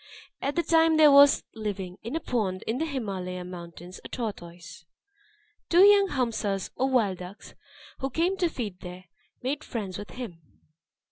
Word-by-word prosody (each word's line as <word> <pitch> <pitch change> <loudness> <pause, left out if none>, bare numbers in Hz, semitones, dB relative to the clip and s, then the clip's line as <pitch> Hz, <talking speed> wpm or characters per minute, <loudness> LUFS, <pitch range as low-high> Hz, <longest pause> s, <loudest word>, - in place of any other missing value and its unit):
At 280 - -2
that 340 - 0
time 325 -1 +4
there 305 -2 +8
was 280 0 +7
living, 200 -4 -5
in 230 +7 -5
a - - 0
pond 205 - -2
in 230 +4 -2
the 320 - -1
Himalaya 190 - -4
mountains, 175 0 -9
a - - -7
tortoise. 175 -8 -7 0.9
Two 345 +2 +6
young 405 -1 +7
hamsas, 220 - -2
or 265 +1 0
wild 215 -8 +1
ducks, 185 +4 -10 0.5
who 270 - -2
came 340 +8 0
to 355 -3 +1
feed 210 - -5
there, 180 +1 -9 0.4
made 285 +4 -2
friends 205 -5 -5
with 205 -2 -8
him. 185 -6 -8
220 Hz, 160 wpm, -27 LUFS, 185-285 Hz, 0.9 s, there